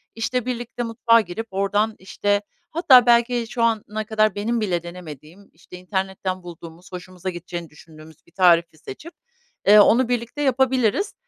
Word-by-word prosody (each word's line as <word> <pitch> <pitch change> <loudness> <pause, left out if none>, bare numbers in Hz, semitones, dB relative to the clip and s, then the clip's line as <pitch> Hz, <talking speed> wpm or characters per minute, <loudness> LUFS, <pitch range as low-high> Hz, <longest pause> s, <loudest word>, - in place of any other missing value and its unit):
işte, 230 +2 -2
birlikte 240 -1 -4
mutfağa 230 0 +3
girip 215 +3 -7
oradan, 205 +3 0
işte, 205 +2 -1 0.3
hatta 265 -7 +5
belki 240 0 +2
şu 235 - -2
ana 215 -1 -1
kadar 215 -2 +1
benim 225 +3 -2
bile 175 -5 -1
denemediğim, 170 +1 -12
işte, 170 +2 -14
internetten 190 0 -4
bulduğumuz, 170 0 -12
hoşumuza 185 0 -7
gideceğini 175 -1 -7
düşündüğümüz 155 0 -17
bir - - -25
tarifi 170 -3 +3
seçip, 310 - -11 0.5
eee, 210 +1 +8
onu 235 +4 +4
birlikte 245 +4 -3
yapabiliriz. 265 - +1
205 Hz, 145 wpm, -22 LUFS, 175-235 Hz, 0.5 s, eee